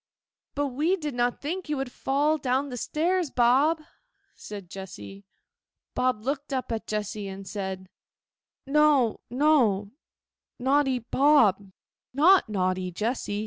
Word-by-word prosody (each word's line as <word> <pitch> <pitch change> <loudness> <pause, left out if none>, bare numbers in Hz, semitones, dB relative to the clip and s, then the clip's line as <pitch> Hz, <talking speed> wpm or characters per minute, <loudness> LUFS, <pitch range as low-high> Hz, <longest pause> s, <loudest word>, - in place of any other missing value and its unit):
'But 285 0 0
we 305 +9 +1
did 300 -6 -5
not 245 0 -1
think 345 +3 -4
you 300 - -1
would 265 -2 -4
fall 290 +5 0
down 265 0 -1
stairs, 335 +6 0
Bob,' 270 +7 +3 0.5
said 200 -3 -9
Jessy. 195 +1 -10 0.7
Bob 250 -4 0
looked 280 +3 -3
up 260 -3 -3
at 225 -1 -3
Jessy, 210 -1 -3
and 195 0 -8
said, 190 -2 -5 0.8
'No, 280 -5 +3
no; 240 -7 +2 0.7
naughty 265 +1 +2
Bob, 230 -6 +3 0.4
not 350 - +5
naughty 185 -2 -1
Jessy. 210 +1 -2
255 Hz, 120 wpm, -26 LUFS, 210-290 Hz, 0.8 s, not